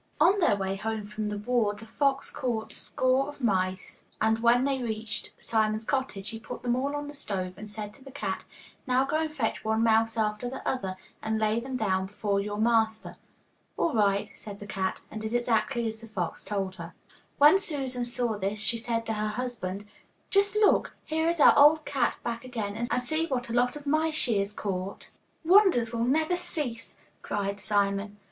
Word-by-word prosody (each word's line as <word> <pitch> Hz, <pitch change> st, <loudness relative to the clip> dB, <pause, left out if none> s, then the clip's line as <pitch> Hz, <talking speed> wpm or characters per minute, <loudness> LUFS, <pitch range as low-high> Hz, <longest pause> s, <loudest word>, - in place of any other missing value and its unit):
On 400 Hz, +2 st, +5 dB
their 335 Hz, -, +4 dB
way 195 Hz, -1 st, -2 dB
home 220 Hz, +1 st, -3 dB
from 210 Hz, 0 st, -4 dB
the 210 Hz, -, -3 dB
war 210 Hz, -1 st, +1 dB
the 215 Hz, +2 st, -11 dB
fox 275 Hz, +4 st, 0 dB
caught 235 Hz, -4 st, -2 dB
score 260 Hz, +1 st, +1 dB
of 290 Hz, -, -10 dB
mice, 190 Hz, -5 st, -1 dB, 0.2 s
and 220 Hz, +1 st, +2 dB
when 235 Hz, +2 st, +4 dB
they 270 Hz, -2 st, 0 dB
reached 220 Hz, -2 st, -4 dB
Simon's 215 Hz, 0 st, 0 dB
cottage 260 Hz, -8 st, -2 dB
he 225 Hz, -, -6 dB
put 235 Hz, +2 st, -8 dB
them 240 Hz, -1 st, +1 dB
all 275 Hz, +3 st, -1 dB
on 290 Hz, 0 st, -4 dB
the 290 Hz, -, -7 dB
stove 190 Hz, -10 st, -3 dB
and 210 Hz, +2 st, -9 dB
said 210 Hz, 0 st, -6 dB
to 275 Hz, -, -17 dB
the 270 Hz, -, -11 dB
cat, 205 Hz, -9 st, -4 dB, 0.4 s
'Now 255 Hz, +1 st, +3 dB
go 290 Hz, -, 0 dB
and 315 Hz, -1 st, -1 dB
fetch 260 Hz, -8 st, -2 dB
one 220 Hz, +1 st, +1 dB
mouse 225 Hz, 0 st, +3 dB
after 215 Hz, +2 st, 0 dB
the 265 Hz, -, -7 dB
other, 195 Hz, -8 st, -1 dB, 0.3 s
and 220 Hz, 0 st, -1 dB
lay 215 Hz, +1 st, +1 dB
them 260 Hz, +2 st, -4 dB
down 190 Hz, -4 st, 0 dB
before 200 Hz, 0 st, -1 dB
your 205 Hz, +1 st, -3 dB
master.' 220 Hz, 0 st, +1 dB, 0.6 s
'All 330 Hz, -, +1 dB
right,' 200 Hz, -2 st, +2 dB
said 200 Hz, -2 st, -9 dB
the 205 Hz, -, -8 dB
cat, 190 Hz, -2 st, -2 dB
and 215 Hz, -, -6 dB
did 220 Hz, +2 st, -3 dB
exactly 240 Hz, 0 st, +1 dB
as 220 Hz, 0 st, -5 dB
the 225 Hz, -, -10 dB
fox 185 Hz, -6 st, -3 dB
told 195 Hz, -2 st, -3 dB
her. 170 Hz, 0 st, -8 dB, 0.4 s
When 300 Hz, +7 st, +7 dB
Susan 270 Hz, -8 st, -1 dB
saw 240 Hz, -3 st, 0 dB
this 200 Hz, +2 st, -1 dB
she 220 Hz, +2 st, +1 dB
said 230 Hz, 0 st, -2 dB
to 225 Hz, -, -1 dB
her 215 Hz, 0 st, -1 dB
husband, 210 Hz, -4 st, -4 dB, 0.5 s
'Just 400 Hz, +1 st, +3 dB
look, 425 Hz, -1 st, +3 dB
here 320 Hz, +1 st, 0 dB
is 340 Hz, -1 st, +1 dB
our -, -, +8 dB
old 300 Hz, +2 st, +6 dB
cat 265 Hz, -4 st, 0 dB
back 235 Hz, 0 st, -3 dB
again, 225 Hz, -5 st, -4 dB
and 250 Hz, -, 0 dB
see 315 Hz, +6 st, 0 dB
what 245 Hz, -4 st, -2 dB
a -, -, -3 dB
lot 245 Hz, +2 st, +2 dB
of 295 Hz, -1 st, -9 dB
mice 310 Hz, +2 st, +1 dB
she 230 Hz, -8 st, +2 dB
has 200 Hz, +1 st, -1 dB
caught.' 195 Hz, -2 st, -4 dB, 0.3 s
'Wonders 345 Hz, -, +5 dB
will 230 Hz, 0 st, 0 dB
never 315 Hz, +7 st, +2 dB
cease,' 290 Hz, -10 st, -4 dB, 0.2 s
cried 200 Hz, 0 st, -3 dB
Simon. 200 Hz, 0 st, 0 dB
225 Hz, 200 wpm, -28 LUFS, 210-265 Hz, 0.6 s, our